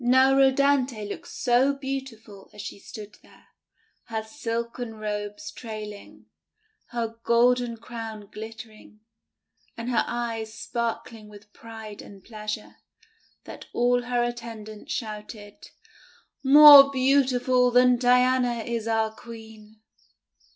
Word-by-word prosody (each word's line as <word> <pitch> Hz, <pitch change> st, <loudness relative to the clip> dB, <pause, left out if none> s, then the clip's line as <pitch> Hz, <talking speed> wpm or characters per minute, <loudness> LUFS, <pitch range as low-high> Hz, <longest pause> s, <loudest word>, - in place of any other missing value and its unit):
Now 260 Hz, +2 st, +4 dB
Rhodanthe 270 Hz, -4 st, +2 dB
looked 205 Hz, -, -8 dB
so 255 Hz, +2 st, +1 dB
beautiful 265 Hz, -7 st, -7 dB
as 210 Hz, -, -8 dB
she -, -, -8 dB
stood 210 Hz, +1 st, -11 dB
there, -, -, -22 dB, 0.6 s
her 220 Hz, -1 st, -4 dB
silken 235 Hz, -1 st, -5 dB
robes 205 Hz, -1 st, -5 dB
trailing, 210 Hz, -2 st, -9 dB, 0.6 s
her 230 Hz, -1 st, -5 dB
golden 240 Hz, 0 st, +2 dB
crown 225 Hz, -2 st, -8 dB
glittering, 220 Hz, -1 st, -11 dB, 0.8 s
and 230 Hz, +2 st, -4 dB
her 235 Hz, -, +2 dB
eyes 230 Hz, -2 st, -4 dB
sparkling 230 Hz, -2 st, -5 dB
with 210 Hz, 0 st, -16 dB
pride 220 Hz, -2 st, -10 dB
and 195 Hz, -2 st, -14 dB
pleasure, 215 Hz, -1 st, -7 dB, 0.7 s
that -, -, -11 dB
all 245 Hz, +1 st, +2 dB
her 245 Hz, 0 st, -1 dB
attendants 225 Hz, -3 st, -7 dB
shouted: 210 Hz, -2 st, -7 dB, 0.4 s
— -, -, -31 dB
'More 280 Hz, 0 st, +10 dB
beautiful 255 Hz, -2 st, +2 dB
than 250 Hz, 0 st, +4 dB
Diana 250 Hz, -1 st, +2 dB
is 230 Hz, -1 st, -4 dB
our 220 Hz, -1 st, 0 dB
Queen!" 220 Hz, -1 st, -13 dB
230 Hz, 110 wpm, -25 LUFS, 215-250 Hz, 0.8 s, More